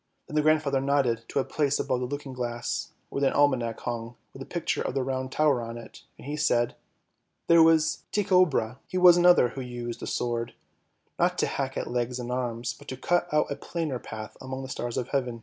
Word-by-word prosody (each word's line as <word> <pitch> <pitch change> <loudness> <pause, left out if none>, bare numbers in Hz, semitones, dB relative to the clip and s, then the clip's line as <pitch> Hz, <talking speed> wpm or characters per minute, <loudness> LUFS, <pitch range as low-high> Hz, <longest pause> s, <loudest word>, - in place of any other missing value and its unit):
" - - -48
Then 155 - -7
the 150 - +4
grandfather 150 -3 +2
nodded 135 -5 +1
to - - -5
a 135 - +3
place 145 -2 0
above 125 - 0
the 125 - -2
looking 140 0 -5
glass, 120 -1 -3 0.2
where 140 - -2
an 135 - +3
almanac 130 -6 +2
hung 120 0 -4 0.2
with - - -10
a - - -7
picture - - -2
of - - -3
the 135 - +1
Round 130 0 -3
Tower 145 -5 +2
x 115 - -6
on 115 - -6
it, 115 - -11 0.2
and - - -13
he 145 +2 -3
said, 120 -6 +1 0.4
" - - -50
There 170 0 +7
was 160 -1 +4
Tycho 185 -3 +4
Brahe, 125 -4 -2
he 185 - -3
was 180 -1 +8
another 175 -7 +6
who 135 - -6
used 120 -1 -5
the - - -6
sword; 120 -1 -2 0.6
not - - +2
to - - +2
hack - - -3
at - - -2
legs 120 0 -1
and 125 -1 -5
arms, 120 -1 -2
but - - -16
to 130 - -5
cut 175 +5 0
out 150 -1 +2
a - - -1
plainer 155 -7 -3
path 110 -2 -8
among 130 0 -5
the 130 - -7
stars 120 -2 -4
of 125 -1 -2
heaven 125 -4 -1
130 Hz, 235 wpm, -27 LUFS, 120-150 Hz, 0.6 s, was